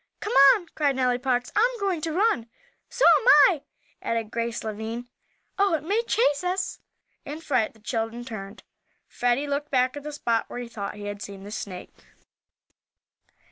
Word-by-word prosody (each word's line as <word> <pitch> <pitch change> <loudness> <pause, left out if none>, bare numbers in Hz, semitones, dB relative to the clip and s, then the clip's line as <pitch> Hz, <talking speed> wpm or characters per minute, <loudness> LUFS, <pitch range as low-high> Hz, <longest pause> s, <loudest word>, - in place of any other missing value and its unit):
"Come 420 - -4 0.2
on!" 370 - -6
cried 285 -3 +1
Nellie 250 -1 +1
Parks. 250 -1 -1
"I'm 480 +2 +2
going 385 -5 -1
to 320 - -2
run!" 360 - +1 0.4
"So 485 - +1
am - - -6 0.2
I!" 315 -6 -4 0.4
added 225 -2 -2
Grace 235 0 -3
Lavine. 220 +2 -5 0.5
"Oh, 395 -4 +3
it 300 - -4
may 405 +8 +1
chase 290 -9 +2
us!" 370 +2 -2 0.4
In 295 +2 -7
fright 255 -9 0
the - - -20
children 225 +2 -3
turned, 210 -3 -8 0.4
Freddie 245 +3 0
looking 285 +1 -3
back 255 0 +1
at 290 - -6
the 300 +1 -6
spot 235 -6 0
where - - -7
he 245 -1 -5
thought 210 -4 -6
he 205 0 -8
had 205 0 -6
seen 195 -1 -8
the 205 - -9
snake. 190 -4 -7
250 Hz, 175 wpm, -25 LUFS, 225-320 Hz, 0.5 s, Oh